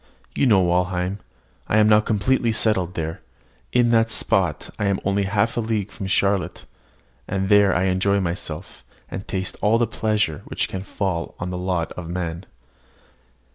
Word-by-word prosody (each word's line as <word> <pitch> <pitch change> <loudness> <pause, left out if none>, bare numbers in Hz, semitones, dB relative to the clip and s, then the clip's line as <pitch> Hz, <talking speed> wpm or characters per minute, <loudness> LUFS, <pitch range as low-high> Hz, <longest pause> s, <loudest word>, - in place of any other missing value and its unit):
You 140 - +2
know 100 -5 +5
Walheim. 90 +2 0 0.5
I 105 - +2
am 105 0 +5
now 105 0 +6
completely 115 +3 +1
settled 100 -5 +1
there. 80 0 -4 0.5
In 120 -1 +3
that 115 -1 +4
spot 90 -7 +1
I 105 - 0
am 100 -1 +1
only 100 0 +1
half 100 +4 0
a - - +3
league 110 -3 -2
from 100 - -6
Charlotte; 100 0 0 0.6
and 95 0 -1
there 100 -2 +5
I 85 - +2
enjoy 95 +2 +2
myself, 85 -4 -5 0.3
and 95 - -6
taste 95 -1 -3
all 105 +3 +4
the 120 - +2
pleasure 105 -9 -1
which - - -2
can 95 - -5
fall 95 -3 -3
to 85 - -3
the 90 0 -4
lot 90 -2 -1
of 85 -2 -7
man. 85 0 -4
95 Hz, 170 wpm, -23 LUFS, 90-105 Hz, 0.6 s, now